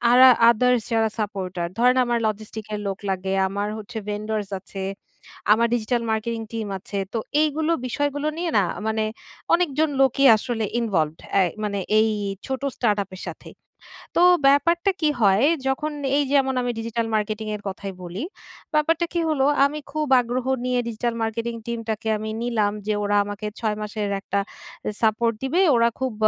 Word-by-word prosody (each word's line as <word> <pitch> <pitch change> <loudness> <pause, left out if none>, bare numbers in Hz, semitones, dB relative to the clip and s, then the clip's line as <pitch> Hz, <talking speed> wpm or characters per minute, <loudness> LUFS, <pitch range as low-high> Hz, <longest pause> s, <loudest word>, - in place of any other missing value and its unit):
আরা 255 +1 +9 0.2
others 250 +1 +2
যারা 225 -1 +3
supporter. 190 -4 -3
ধরেন 250 +2 +4
আমার 240 -1 0
logistics 215 0 -4
এর 210 - -3
লোক 195 -1 -2
লাগে, 190 0 -2 0.2
আমার 200 +2 -2
হচ্ছে 220 +2 -7
vendors 210 0 -3
আছে, 195 +1 -9 0.7
আমার 230 +2 +4
ডিজিটাল 235 +1 0
মার্কেটিং 225 +1 -1
টিম 225 -2 -3
আছে। 200 +1 -6
তো 230 - -1 0.2
এইগুলো 310 +1 0 0.2
বিষয়গুলো 290 +3 -1
নিয়ে 345 -1 -1
না 200 - +4 0.2
মানে 220 0 0 0.5
অনেকজন 315 -3 +2
লোকই 270 +1 +4
আসলে 225 0 -2
ইনভলভড, 165 -9 0 0.2
আ - - +6 0.2
মানে 200 -1 -1 0.2
এই 220 +1 +4 0.4
ছোট 265 -1 -3 0.2
স্টার্ট 210 -4 +1
আপ 195 - -28
এর - - -9
সাথে। - - -9 0.7
তো - - +4 0.3
ব্যাপারটা 335 +7 +3
কী 310 - +3
হয়, 200 +4 +5 0.2
যখন 300 +3 -1 0.3
এই 290 - +3
যেমন 265 -2 +3
আমি 245 0 -1
ডিজিটাল 230 0 -2
মার্কেটিং 215 0 -2
এর 210 - -8
কথাই 195 0 -5
বলি, 180 +7 -5 0.5
ব্যাপারটা 325 +3 +2
কী 345 - +1
হলো 280 -4 +2 0.2
আমি 295 +2 -2
খুব 305 +1 -1
আগ্রহ 245 +1 -3 0.2
নিয়ে 250 0 +1
ডিজিটাল 235 +1 -2
মার্কেটিং 230 +1 -2
টিমটাকে 225 -2 -3
আমি 215 +1 -5
নিলাম 225 -4 +1 0.2
যে 215 - +2
ওরা 205 0 +1
আমাকে 205 +1 -6
6 215 -2 0
মাসের 210 -1 -3
একটা 200 - -1 0.6
সাপোর্ট 230 +1 +2
দিবে। 330 +8 +2
ওরা 235 0 +4
খুব 260 -2 -1
230 Hz, 165 wpm, -23 LUFS, 210-260 Hz, 0.7 s, আরা